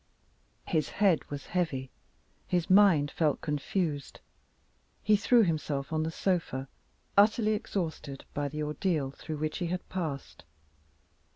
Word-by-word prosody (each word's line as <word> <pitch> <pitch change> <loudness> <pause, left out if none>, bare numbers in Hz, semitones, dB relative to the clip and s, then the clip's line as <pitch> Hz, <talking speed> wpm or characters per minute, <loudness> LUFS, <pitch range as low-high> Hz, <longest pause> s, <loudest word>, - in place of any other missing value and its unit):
His 155 -4 0
head 195 -6 +3
was 145 -1 -6
heavy; 140 -8 -1 0.6
his 175 0 0
mind 185 -8 +6
felt 155 -4 +1
confused. 150 0 -2 0.8
He 215 - +5
threw 225 +3 +5
himself 155 -4 -1
on 155 - +1
the 160 - -1
sofa 165 -7 -1 0.5
utterly 215 +2 +5
exhausted 160 -9 -4
by 145 0 -1
the 150 +2 -4
ordeal 150 -2 -1
through 155 +2 -6
which 155 +3 -2
he 175 - -1
had 180 +1 -3
passed. 160 -7 -4
160 Hz, 125 wpm, -30 LUFS, 145-185 Hz, 0.8 s, mind